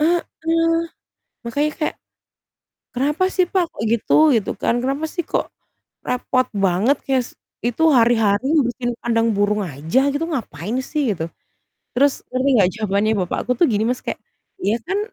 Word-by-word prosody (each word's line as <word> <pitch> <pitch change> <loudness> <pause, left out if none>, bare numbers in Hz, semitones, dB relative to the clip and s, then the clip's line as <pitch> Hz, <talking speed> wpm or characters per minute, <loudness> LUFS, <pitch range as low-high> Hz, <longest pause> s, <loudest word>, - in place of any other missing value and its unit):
Heeh, 340 +3 +3 1.2
makanya 285 +6 0
kayak, 305 - -1 1.0
"Kenapa 295 +8 0
sih, 365 - +4
Pak, 365 0 +1
kok 215 - -7
gitu?" 235 - -1 0.2
gitu 215 - 0
kan. - - +1
"Kenapa 275 +4 -1
sih 345 +3 -3
kok - - -2 0.6
repot 255 0 0 0.2
banget 195 +10 +2
kayak 265 -2 +1
s - - -16 0.3
itu 245 +7 0
hari-hari 225 -1 +3
ngebersihin 245 -4 0
kandang 230 -1 +2
burung 205 +1 +1
aja 160 - 0
gitu 305 +3 -1
ngapain 210 - -4
sih 275 -5 -1
gitu?" 160 -3 -4 0.7
Terus 280 +2 +3
ngerti 260 +2 +1
enggak 180 - +5
jawabannya 210 0 0
bapakku 225 +7 -3
tuh 345 - +6
gini, 210 0 +1
Mas, 250 - -2
kayak, - - -3 0.4
"Ya 215 - +1
kan 395 +2 0
245 Hz, 150 wpm, -20 LUFS, 210-285 Hz, 1.2 s, tuh